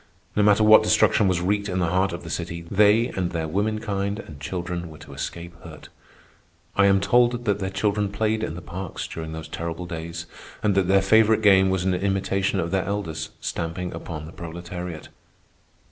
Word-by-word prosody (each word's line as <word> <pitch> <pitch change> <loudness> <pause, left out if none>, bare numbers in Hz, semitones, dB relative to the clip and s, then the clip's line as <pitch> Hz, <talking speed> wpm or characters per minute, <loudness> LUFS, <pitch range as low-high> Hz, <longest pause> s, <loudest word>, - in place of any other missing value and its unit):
No 105 - +3
matter 105 +1 +5
what 110 0 +8
destruction 110 -1 +3
was 90 -2 +1
wreaked 100 +3 0
in 90 - -2
the 90 -2 +1
heart 95 +1 +2
of 85 +1 -6
the 80 - -7
city, 85 +2 -4
they, 105 +4 +4
and 90 -2 -2
their 80 -2 -3
womenkind 100 +2 -1
and 80 -10 -10
children, 85 +1 -4
were 80 - -11
to 75 -3 -12
escape 85 +4 -6
hurt. 80 -4 -12 0.9
I 100 0 +5
am 95 0 +4
told 120 +4 +2
that 100 -2 +1
their 95 -1 -2
children 100 +1 0
played 110 +1 0
in 80 - -3
the 90 - -8
parks 95 0 -6
during 80 -1 -6
those 80 0 -7
terrible 85 +2 -5
days 85 -1 -6 0.4
and 105 -2 +3
that 95 -2 +2
their 95 0 +4
favorite 110 +2 +4
game 95 -2 +6
was 95 -1 0
an 95 0 +1
imitation 95 +1 0
of 85 -1 -2
their 95 -1 0
elders 85 -6 -3
stamping 85 +2 -3
upon 80 -3 -6
the 80 - -10
proletariat. 85 0 -7
95 Hz, 190 wpm, -24 LUFS, 85-100 Hz, 0.9 s, what